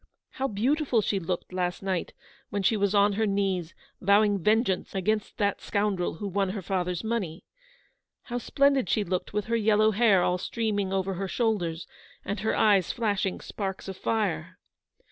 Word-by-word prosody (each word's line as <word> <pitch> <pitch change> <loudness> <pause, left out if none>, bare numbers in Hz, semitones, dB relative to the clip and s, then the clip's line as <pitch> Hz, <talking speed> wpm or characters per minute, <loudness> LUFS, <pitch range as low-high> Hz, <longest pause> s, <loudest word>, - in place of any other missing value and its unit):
How 270 - -2
beautiful 255 +3 +1
she 195 - 0
looked 180 +1 -4
last 180 0 -2
night 190 -3 -2 0.4
when 200 -1 -2
she 220 - +3
was 200 -1 +1
on 205 0 +4
her 220 +2 +1
knees, 195 -4 -1 0.3
vowing 200 +1 +4
vengeance 210 0 +1
against 210 +3 -1
that 200 -1 0
scoundrel 200 -5 -1
who 205 +5 -5
won 195 0 0
her 195 +1 -4
father's 180 -1 -2
money. 205 -7 -3 0.8
How 245 0 -4
splendid 275 +1 +2
she 215 - +2
looked 180 -1 -3
with 210 -1 -1
her 230 - 0
yellow 215 -1 +4
hair 205 -4 +4
all 180 0 +1
streaming 205 -2 -1
over 195 0 0
her 195 +2 -3
shoul 220 +2 +1
ders, 165 -1 -4 0.4
and 200 0 -3
her 220 +2 0
eyes 200 -5 +4
flashing 200 -5 -1
sparks 195 -2 -5
of 190 - -5
fire 185 -5 -2
200 Hz, 170 wpm, -27 LUFS, 185-220 Hz, 0.8 s, on